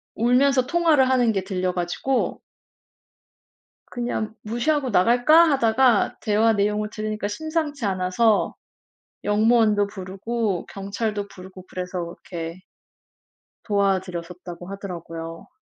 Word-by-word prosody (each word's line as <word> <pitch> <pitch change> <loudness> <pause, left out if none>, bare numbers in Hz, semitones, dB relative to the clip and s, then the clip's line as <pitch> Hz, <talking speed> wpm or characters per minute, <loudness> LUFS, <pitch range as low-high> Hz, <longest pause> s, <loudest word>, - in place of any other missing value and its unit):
울면서 255 +3 +3
통화를 315 -5 +3
하는 245 -3 +3
게 195 -3 -1
들려 185 -2 -2
가지고 180 +9 -1 1.5
그냥 240 -3 -3
'무시하고 255 +5 0
나갈까.' 245 - +5
하다가 245 -3 +3
대화 220 +2 +3
내용을 210 +1 0
들으니까 215 -1 -3
심상치 310 0 -3
않아서 195 +3 +1 0.7
역무원도 215 -1 +3
부르고 195 +1 -3
경찰도 200 +1 -3
부르고 185 0 -12
그래서 180 0 -4 0.2
이렇게 170 +1 -7 1.0
도와 200 -2 +2
드렸었다고 175 -1 -8
하더라고요. 165 -4 -7
210 Hz, 275 characters per minute, -23 LUFS, 185-240 Hz, 1.5 s, 나갈까